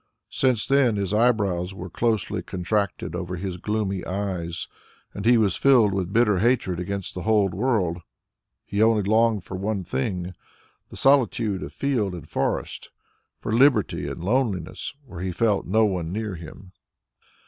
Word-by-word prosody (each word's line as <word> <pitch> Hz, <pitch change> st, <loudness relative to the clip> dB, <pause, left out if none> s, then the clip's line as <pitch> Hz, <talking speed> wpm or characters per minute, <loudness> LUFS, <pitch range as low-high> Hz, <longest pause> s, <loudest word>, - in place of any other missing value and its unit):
Since 130 Hz, -5 st, +2 dB
then 135 Hz, -5 st, +3 dB
his 100 Hz, -1 st, -2 dB
eyebrows 100 Hz, -6 st, +1 dB
were 95 Hz, -, -7 dB
closely 110 Hz, +4 st, -1 dB
contracted 95 Hz, +2 st, -2 dB
over 90 Hz, +1 st, -4 dB
his 90 Hz, 0 st, -4 dB
gloomy 100 Hz, -1 st, -2 dB
eyes, 90 Hz, -3 st, -3 dB, 0.5 s
and -, -, -4 dB
he 120 Hz, 0 st, +6 dB
was 105 Hz, -4 st, +2 dB
filled 120 Hz, -7 st, +5 dB
with 95 Hz, -1 st, -2 dB
bitter 105 Hz, -3 st, +3 dB
hatred 110 Hz, -6 st, +1 dB
against 100 Hz, +1 st, -4 dB
the 90 Hz, -, -5 dB
whole 105 Hz, -1 st, +3 dB
world. 95 Hz, -4 st, 0 dB, 0.7 s
He 100 Hz, +1 st, -1 dB
only 110 Hz, -2 st, +4 dB
longed 110 Hz, 0 st, +2 dB
for 95 Hz, +2 st, -6 dB
one 100 Hz, 0 st, -2 dB
thing, 90 Hz, +5 st, -3 dB, 0.6 s
the -, -, -10 dB
solitude 115 Hz, -7 st, +2 dB
of -, -, -6 dB
field 115 Hz, -10 st, -1 dB
and 80 Hz, -3 st, -9 dB
forest, -, -, -2 dB, 0.5 s
for -, -, -5 dB
liberty 120 Hz, -3 st, +3 dB
and 85 Hz, -, -6 dB
loneliness, 110 Hz, -2 st, -1 dB
where 95 Hz, -9 st, -9 dB
he 95 Hz, 0 st, -2 dB
felt 105 Hz, +2 st, +1 dB
no 110 Hz, +4 st, +3 dB
one 90 Hz, -5 st, -2 dB
near 105 Hz, 0 st, -3 dB
him. 85 Hz, +2 st, -11 dB
100 Hz, 155 wpm, -24 LUFS, 90-115 Hz, 0.7 s, he